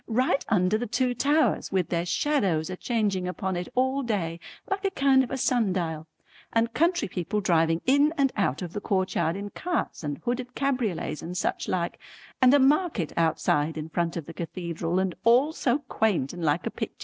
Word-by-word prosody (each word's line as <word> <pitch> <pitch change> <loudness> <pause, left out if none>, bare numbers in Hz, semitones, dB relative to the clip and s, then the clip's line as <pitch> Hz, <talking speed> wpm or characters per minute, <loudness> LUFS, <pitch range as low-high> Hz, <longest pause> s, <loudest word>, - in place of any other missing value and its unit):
Right 255 +4 +1
under 200 0 +2
the 245 - -3
two 250 +3 0
towers, 290 +5 +1
with 185 -4 0
their 170 0 -1
shadows 185 - +1
a - - -3
changing 200 -4 -1
upon 190 +1 -3
it 175 0 -3
all 260 +2 +2
day 185 -9 -2 0.3
like 390 0 -2
a 390 - +2
kind 275 -7 +3
of 250 - -5
a 265 - -3
sundial, 185 -11 0 0.4
and 230 0 +1
country 345 - +2
people 185 +3 -2
driving 165 -3 +2
in 285 +3 +4
and 275 -2 +3
out 180 -7 0
of 175 -1 -7
the 205 - -4
courtyard 185 -4 0
in 200 +1 -6
carts 350 - -3
and 145 -1 -3
hooded 250 +1 -3
cabriolets 250 - -1
and 180 +2 -5
such - - -1
like, 175 -2 -2 0.4
and 255 -1 +7
a 285 - +6
market 275 - +2
outside 160 -1 +1
in 155 +1 -5
front 170 +1 -1
of 165 - -5
the 165 - -9
cathedral, 170 +1 -3
and 190 -1 0
all 255 +7 +4
so 255 -4 +1
quaint 195 -12 0
and 175 -1 -6
like 150 -2 +1
a - - -2
picter. - - -5
200 Hz, 195 wpm, -26 LUFS, 170-255 Hz, 0.4 s, and